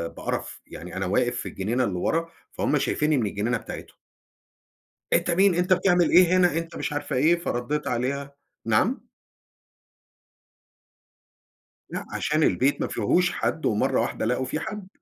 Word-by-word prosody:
بقرف. -, -, -4 dB
يعني 90 Hz, +2 st, -9 dB
أنا 95 Hz, -, -1 dB
واقف 120 Hz, +6 st, +1 dB
في -, -, -4 dB
الجنينة 115 Hz, +7 st, -1 dB
اللي 95 Hz, -6 st, -2 dB
ورا، 165 Hz, -, 0 dB, 0.2 s
فهُم -, -, 0 dB
شايفيني 150 Hz, -1 st, +1 dB
من 115 Hz, -, +1 dB
الجنينة 110 Hz, +4 st, -1 dB
بتاعتهم. -, -, -9 dB, 1.2 s
أنت 175 Hz, -, +2 dB
مين؟ 190 Hz, +1 st, +4 dB
أنت 180 Hz, +2 st, +3 dB
بتعمل 180 Hz, -1 st, +3 dB
إيه 180 Hz, +1 st, +6 dB
هنا؟ 175 Hz, -3 st, +3 dB
أنت 165 Hz, 0 st, -4 dB
مش -, -, -3 dB
عارفة 145 Hz, -1 st, -3 dB
إيه. 155 Hz, +7 st, +4 dB
فرديت 145 Hz, -1 st, -2 dB
عليها. 140 Hz, +3 st, -2 dB, 0.3 s
نعم؟ -, -, +1 dB, 2.8 s
لأ، -, -, -5 dB
عشان 155 Hz, +1 st, 0 dB
البيت 135 Hz, +3 st, +2 dB
ما -, -, 0 dB
فيهوش 180 Hz, -, +1 dB
حد، 160 Hz, -, -2 dB
ومرّة 105 Hz, -1 st, +1 dB
واحدة -, -, -2 dB
لقوا 125 Hz, +3 st, 0 dB
فيه 155 Hz, +4 st, -3 dB
حد. 210 Hz, -3 st, -6 dB
145 Hz, 150 wpm, -25 LUFS, 120-175 Hz, 2.8 s, إيه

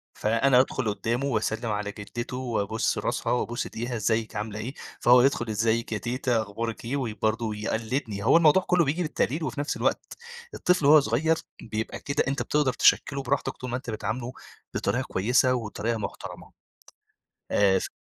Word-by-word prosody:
فأنا 120 Hz, +4 st, +3 dB
أدخُل 130 Hz, -2 st, +1 dB
قُدّامه 115 Hz, +6 st, -2 dB
واسلِّم 110 Hz, -2 st, -1 dB
على 105 Hz, 0 st, -2 dB
جدِّته 110 Hz, +5 st, -6 dB
وأبوس 115 Hz, -4 st, -1 dB
راسها -, -, -1 dB
وابوس 120 Hz, -1 st, -1 dB
إيديها، 120 Hz, +2 st, -4 dB
ازّيِك، 110 Hz, 0 st, 0 dB
عاملة 105 Hz, 0 st, -4 dB
إيه؟ 120 Hz, +5 st, -5 dB, 0.3 s
فهو 125 Hz, +1 st, +6 dB
يدخُل، 125 Hz, -3 st, +1 dB
"إزّيِك 115 Hz, +2 st, 0 dB
يا 110 Hz, -, 0 dB
تيتة، 120 Hz, +2 st, 0 dB
أخبارِك 110 Hz, +2 st, -5 dB
إيه؟" 125 Hz, +4 st, -2 dB
و 120 Hz, -6 st, -2 dB
برضه 110 Hz, +1 st, +1 dB
ويقلِّدني، 110 Hz, 0 st, -3 dB
هو 130 Hz, +8 st, +6 dB
الموضوع 170 Hz, +3 st, +5 dB
كله 180 Hz, -2 st, +3 dB
بييجي 155 Hz, +6 st, -1 dB
بالتقليد 155 Hz, -1 st, -1 dB
وفي 150 Hz, -, -3 dB
نفس 145 Hz, -, -2 dB
الوقت، -, -, -1 dB, 0.4 s
الطفل 180 Hz, -5 st, +1 dB
وهو 150 Hz, +2 st, +8 dB
صغير 145 Hz, +6 st, +1 dB, 0.3 s
بيبقى 110 Hz, 0 st, -4 dB
كده، 140 Hz, -, 0 dB
أنت 135 Hz, +2 st, -1 dB
بتقدَر 145 Hz, -4 st, +1 dB
تشكِّله 140 Hz, 0 st, +3 dB
براحتك 140 Hz, +2 st, -1 dB
طول 125 Hz, -, -6 dB
ما 125 Hz, -, -1 dB
أنت 130 Hz, -1 st, -8 dB
بتعامله 115 Hz, +3 st, -3 dB, 0.4 s
بطريقة -, -, 0 dB
كويسة 125 Hz, +6 st, +2 dB
وبطريقة 115 Hz, -1 st, -2 dB
محترمة. 105 Hz, -, -7 dB, 1.0 s
آآ 95 Hz, -2 st, +4 dB
ف -, -, -4 dB
120 Hz, 165 wpm, -26 LUFS, 110-135 Hz, 1.0 s, وهو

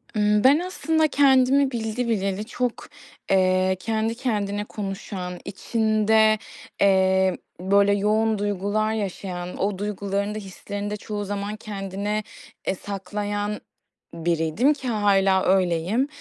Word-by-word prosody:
Iıı, 210 Hz, +1 st, +3 dB
ben 280 Hz, +4 st, +6 dB
aslında 320 Hz, -3 st, +1 dB
kendimi 275 Hz, -1 st, +4 dB
bildi 235 Hz, 0 st, -2 dB
bileli 200 Hz, -1 st, -1 dB
çok, 245 Hz, 0 st, -3 dB, 0.4 s
eee, 185 Hz, 0 st, +3 dB
kendi 225 Hz, +2 st, -1 dB
kendine 205 Hz, -5 st, -1 dB
konuşan, 195 Hz, -3 st, -5 dB
içinde, 215 Hz, +1 st, +2 dB, 0.4 s
eee, 190 Hz, -1 st, +3 dB, 0.2 s
böyle, 200 Hz, +2 st, +3 dB
yoğun 215 Hz, +2 st, +2 dB
duygular 205 Hz, +2 st, 0 dB
yaşayan, 185 Hz, -4 st, -4 dB
o 200 Hz, 0 st, -1 dB
duygularını 200 Hz, 0 st, -2 dB
da -, -, -3 dB
hislerini 200 Hz, +1 st, -6 dB
de 210 Hz, -, -3 dB
çoğu 205 Hz, -1 st, -5 dB
zaman 205 Hz, +1 st, -3 dB
kendine, 205 Hz, 0 st, -4 dB, 0.4 s
eee, 190 Hz, -, +1 dB
saklayan 205 Hz, +2 st, -4 dB, 0.5 s
biriydim 170 Hz, -, +1 dB
ki 275 Hz, -3 st, -7 dB
hâlâ 195 Hz, -4 st, +3 dB
öyleyim. 185 Hz, +6 st, +2 dB
205 Hz, 115 wpm, -24 LUFS, 195-220 Hz, 0.5 s, ben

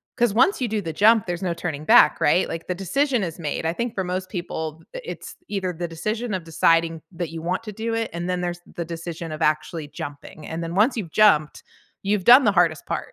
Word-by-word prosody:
'cause 240 Hz, -4 st, +2 dB
once 310 Hz, -, +3 dB
you 250 Hz, -, +1 dB
do 215 Hz, -1 st, -1 dB
the 165 Hz, -4 st, -4 dB
jump, 215 Hz, +5 st, +4 dB
there's 175 Hz, +1 st, -3 dB
no 175 Hz, -2 st, 0 dB
turning 160 Hz, -3 st, -5 dB
back, -, -, +6 dB
right? 175 Hz, +5 st, +3 dB
Like, 165 Hz, -, -5 dB
the 180 Hz, -, -1 dB
decision 245 Hz, -, 0 dB
is 170 Hz, -3 st, -4 dB
made. 155 Hz, 0 st, -3 dB
I 165 Hz, -, 0 dB
think 235 Hz, +5 st, -3 dB
for 190 Hz, -, -2 dB
most 185 Hz, +1 st, -3 dB
people, 160 Hz, -4 st, -5 dB
th -, -, -7 dB
it's -, -, -8 dB
either 195 Hz, -3 st, -2 dB
the 175 Hz, +1 st, -4 dB
decision 215 Hz, +7 st, -3 dB
of 185 Hz, -2 st, -2 dB
deciding 165 Hz, 0 st, +2 dB
that 175 Hz, -2 st, -4 dB
you 165 Hz, 0 st, -7 dB
want 180 Hz, +4 st, -1 dB
to 215 Hz, -, -7 dB
do 225 Hz, +3 st, -4 dB
it, 225 Hz, 0 st, -1 dB
and 170 Hz, +1 st, -4 dB
then 180 Hz, -1 st, -1 dB
there's 175 Hz, -1 st, -3 dB, 0.2 s
the 170 Hz, -, -3 dB
decision 165 Hz, 0 st, -6 dB
of 155 Hz, +1 st, -6 dB
actually 155 Hz, +1 st, -1 dB
jumping, 145 Hz, +1 st, -9 dB
and 165 Hz, +1 st, -4 dB
then, 165 Hz, 0 st, -5 dB
once 225 Hz, +6 st, +3 dB
you've 180 Hz, -8 st, -4 dB
jumped, 155 Hz, -8 st, +3 dB, 0.4 s
you've 200 Hz, -1 st, 0 dB
done 250 Hz, +6 st, +8 dB
the 205 Hz, -, +5 dB
hardest 170 Hz, -5 st, +2 dB
part. -, -, -4 dB
175 Hz, 240 wpm, -23 LUFS, 165-210 Hz, 0.4 s, done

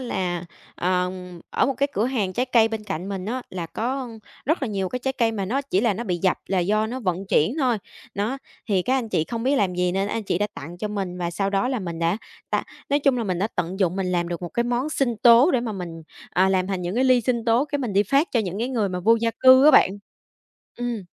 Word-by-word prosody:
là, 180 Hz, -8 st, -2 dB, 0.3 s
ờ, 180 Hz, 0 st, 0 dB, 0.4 s
ở -, -, +2 dB
một 275 Hz, -, 0 dB
cái 280 Hz, -, 0 dB
cửa 210 Hz, -, 0 dB
hàng 215 Hz, -8 st, -1 dB
trái 250 Hz, +5 st, -1 dB
cây 230 Hz, -3 st, +4 dB
bên 220 Hz, -1 st, -5 dB
cạnh 190 Hz, -1 st, -4 dB
mình 190 Hz, -2 st, -4 dB
á, 250 Hz, +4 st, -3 dB
là 175 Hz, -3 st, -4 dB
có 255 Hz, +7 st, -3 dB, 0.4 s
rất 310 Hz, 0 st, 0 dB
là 260 Hz, -, 0 dB
nhiều 195 Hz, -3 st, -2 dB
cái 250 Hz, -, -3 dB
trái 265 Hz, +1 st, -2 dB
cây 230 Hz, -3 st, +1 dB
mà 200 Hz, -3 st, -2 dB
nó 255 Hz, +9 st, 0 dB
chỉ 195 Hz, -9 st, 0 dB
là 220 Hz, -2 st, +2 dB
nó 235 Hz, -, -4 dB
bị 180 Hz, -5 st, -1 dB
dập 185 Hz, -, +3 dB
là 190 Hz, -1 st, 0 dB
do 215 Hz, +5 st, +1 dB
nó 255 Hz, +3 st, -5 dB
vận 190 Hz, -2 st, -2 dB
chuyển 190 Hz, -, +2 dB
thôi. 250 Hz, -5 st, +2 dB, 0.4 s
Đó, 215 Hz, +7 st, -2 dB, 0.3 s
thì 190 Hz, -4 st, +2 dB
các 255 Hz, -, +1 dB
anh 230 Hz, -3 st, -4 dB
chị 160 Hz, -, 0 dB
không 230 Hz, +4 st, -4 dB
biết 270 Hz, +3 st, +2 dB
làm 190 Hz, -7 st, +1 dB
gì 180 Hz, 0 st, 0 dB
nên 195 Hz, +2 st, 0 dB
anh 225 Hz, -, -2 dB
chị 180 Hz, -, -1 dB
đã 205 Hz, -, +1 dB
tặng 170 Hz, +5 st, -9 dB
cho 210 Hz, -, -3 dB
mình, 195 Hz, -3 st, -4 dB
và 170 Hz, -1 st, -2 dB
sau 195 Hz, +3 st, -1 dB
đó 195 Hz, +4 st, +1 dB
là 260 Hz, -1 st, -1 dB
mình 170 Hz, -5 st, -5 dB
đã 170 Hz, +3 st, +1 dB, 0.3 s
ta -, -, +1 dB, 0.3 s
nói 285 Hz, +1 st, +3 dB
chung 275 Hz, -3 st, +2 dB
là 230 Hz, -, -1 dB
mình 185 Hz, -3 st, -1 dB
đã 200 Hz, -, +1 dB
tận 180 Hz, +3 st, -2 dB
dụng 185 Hz, -1 st, +2 dB
mình 190 Hz, -, -1 dB
làm 175 Hz, -1 st, 0 dB
được 175 Hz, 0 st, -5 dB
một 175 Hz, -, -3 dB
cái 235 Hz, -, -1 dB
món 245 Hz, +5 st, -1 dB
sinh 260 Hz, -6 st, 0 dB
tố 240 Hz, -, +6 dB
để 255 Hz, -, +2 dB
mà 230 Hz, -3 st, -3 dB
mình, 170 Hz, -4 st, -7 dB, 0.3 s
à, 190 Hz, +1 st, +3 dB
làm 185 Hz, -1 st, +1 dB
thành 190 Hz, -2 st, -3 dB
những 175 Hz, +2 st, -3 dB
cái 255 Hz, +3 st, +2 dB
ly 255 Hz, -2 st, +5 dB
sinh 235 Hz, 0 st, -1 dB
tố, 235 Hz, +3 st, +3 dB
cái 290 Hz, -1 st, -3 dB
mình 245 Hz, -6 st, -3 dB
đi 200 Hz, +1 st, +4 dB
phát 275 Hz, -, +2 dB
cho 235 Hz, -, +3 dB
những 195 Hz, -1 st, -4 dB
cái 240 Hz, -, -1 dB
người 225 Hz, -6 st, 0 dB
mà 180 Hz, -1 st, -3 dB
vô 225 Hz, +5 st, +5 dB
gia 230 Hz, -, +1 dB
cư 260 Hz, +1 st, +8 dB
á 305 Hz, -, +9 dB
bạn. -, -, +6 dB, 0.9 s
Ừm. 240 Hz, -4 st, -3 dB
210 Hz, 280 wpm, -23 LUFS, 185-245 Hz, 0.9 s, á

